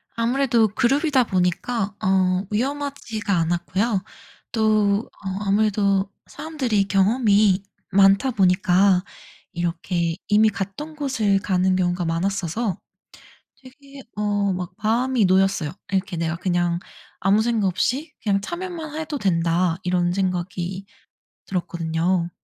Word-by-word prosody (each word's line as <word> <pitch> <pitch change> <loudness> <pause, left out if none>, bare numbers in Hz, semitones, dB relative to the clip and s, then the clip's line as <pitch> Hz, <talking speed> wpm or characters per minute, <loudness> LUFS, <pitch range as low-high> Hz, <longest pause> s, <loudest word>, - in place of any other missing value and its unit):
아무래도 235 -1 +2
그룹이다 265 - +2
보니까 195 +4 -1
어 185 0 +2
위험하지가 260 -3 -2
않았고요. 185 +5 0 0.5
또 215 -1 +2
어 190 - -3 0.2
아무래도 200 -1 +2 0.2
사람들이 265 -10 -1
경험이 200 0 +3 0.3
많다 195 +6 +4
보니까 185 -2 +3 0.5
이렇게 170 0 -2
이미 215 +1 +5
갔던 200 +11 -6
곳을 230 -9 +1
가는 185 -1 +1
경우가 175 -1 0
많았어서 185 +4 -1 0.9
되게 275 +1 -14
어 205 -1 0
막 180 -1 -4
마음이 235 +1 +2
놓였어요. 190 -4 +2 0.2
이렇게 190 -1 -1
내가 165 0 -1
그냥 175 -1 0 0.4
아무 200 +3 +3
생각 225 -3 +1
없이 255 - -1
그냥 200 -2 +1
'참여만 340 - -6
해도 315 -2 -4
된다.' 170 -3 +1
이런 180 -1 +1
생각이 185 0 -3 0.6
들었거든요. 170 -1 -1
195 Hz, 265 characters per minute, -22 LUFS, 180-230 Hz, 0.9 s, 이미